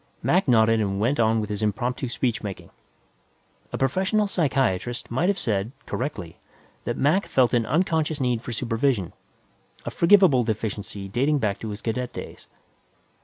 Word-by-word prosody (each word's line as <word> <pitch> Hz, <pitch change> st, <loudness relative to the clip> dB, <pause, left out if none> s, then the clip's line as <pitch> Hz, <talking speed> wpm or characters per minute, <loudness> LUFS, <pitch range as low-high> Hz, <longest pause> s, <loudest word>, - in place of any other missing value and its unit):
Mac 185 Hz, 0 st, +2 dB
nodded 115 Hz, -2 st, +4 dB
and 100 Hz, -1 st, -1 dB
went 120 Hz, +7 st, +1 dB
on 110 Hz, 0 st, +3 dB
with 105 Hz, -1 st, -4 dB
his 105 Hz, 0 st, -3 dB
impromptu 125 Hz, +4 st, -1 dB
speechmaking; 115 Hz, -5 st, -3 dB, 1.0 s
a -, -, -3 dB
professional 190 Hz, -, +1 dB
psychiatrist 130 Hz, -, -1 dB
might 165 Hz, +10 st, +1 dB
have 200 Hz, -, +1 dB
said, 105 Hz, -, -1 dB
correctly, 110 Hz, -, -5 dB, 0.5 s
that -, -, -2 dB
Mac 160 Hz, +9 st, +2 dB
felt 130 Hz, -2 st, +2 dB
an 115 Hz, -2 st, +2 dB
unconscious 160 Hz, 0 st, +1 dB
need 125 Hz, -3 st, 0 dB
for 120 Hz, -, -7 dB
supervision, 115 Hz, -4 st, -1 dB, 0.7 s
a -, -, -3 dB
forgivable 170 Hz, -8 st, +5 dB
deficiency 105 Hz, -3 st, -4 dB
dating 135 Hz, +9 st, +1 dB
back 105 Hz, -6 st, -1 dB
to 110 Hz, -, -5 dB
his 105 Hz, 0 st, -7 dB
cadet 125 Hz, +2 st, -3 dB
days. -, -, -9 dB
120 Hz, 150 wpm, -24 LUFS, 110-145 Hz, 1.0 s, forgivable